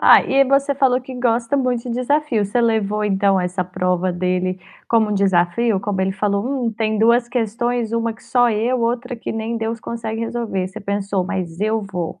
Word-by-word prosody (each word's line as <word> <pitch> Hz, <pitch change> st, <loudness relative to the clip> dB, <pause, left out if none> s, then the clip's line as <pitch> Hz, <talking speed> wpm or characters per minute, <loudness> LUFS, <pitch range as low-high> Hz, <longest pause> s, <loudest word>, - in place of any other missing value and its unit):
Ah, -, -, +7 dB
e 275 Hz, +1 st, +3 dB
você 275 Hz, +1 st, +2 dB
falou 260 Hz, -2 st, +3 dB
que 260 Hz, +1 st, -10 dB
gosta 240 Hz, +2 st, +1 dB
muito 250 Hz, -3 st, 0 dB
de 250 Hz, -, -5 dB
desafio. 250 Hz, -1 st, 0 dB
Você 205 Hz, +5 st, 0 dB
levou 215 Hz, -3 st, +1 dB
então 195 Hz, -1 st, +2 dB
essa 180 Hz, +1 st, -2 dB
prova 180 Hz, 0 st, -1 dB
dele 185 Hz, +1 st, -1 dB, 0.3 s
como 225 Hz, -2 st, +3 dB
um 210 Hz, -, 0 dB
desafio? 195 Hz, +3 st, +2 dB
Como 195 Hz, -1 st, -2 dB
ele 190 Hz, 0 st, +1 dB
falou: 200 Hz, 0 st, -1 dB
"Hum, 255 Hz, -4 st, -1 dB
tem 220 Hz, 0 st, -1 dB
2 235 Hz, +2 st, +4 dB
questões, 240 Hz, 0 st, -1 dB
1 230 Hz, 0 st, 0 dB
que 225 Hz, -, -20 dB
só 245 Hz, -1 st, +3 dB
eu, 235 Hz, +4 st, 0 dB
outra 245 Hz, +2 st, -1 dB
que 230 Hz, -, -5 dB
nem 225 Hz, +1 st, -3 dB
Deus 225 Hz, 0 st, -3 dB
consegue 225 Hz, -1 st, -4 dB
resolver". 225 Hz, -5 st, -2 dB
Você 190 Hz, -, -9 dB
pensou: 200 Hz, -1 st, -1 dB
"Mas 180 Hz, -4 st, -4 dB
eu 215 Hz, +1 st, 0 dB
vou"? 180 Hz, -3 st, -5 dB
220 Hz, 195 wpm, -20 LUFS, 195-240 Hz, 0.3 s, Ah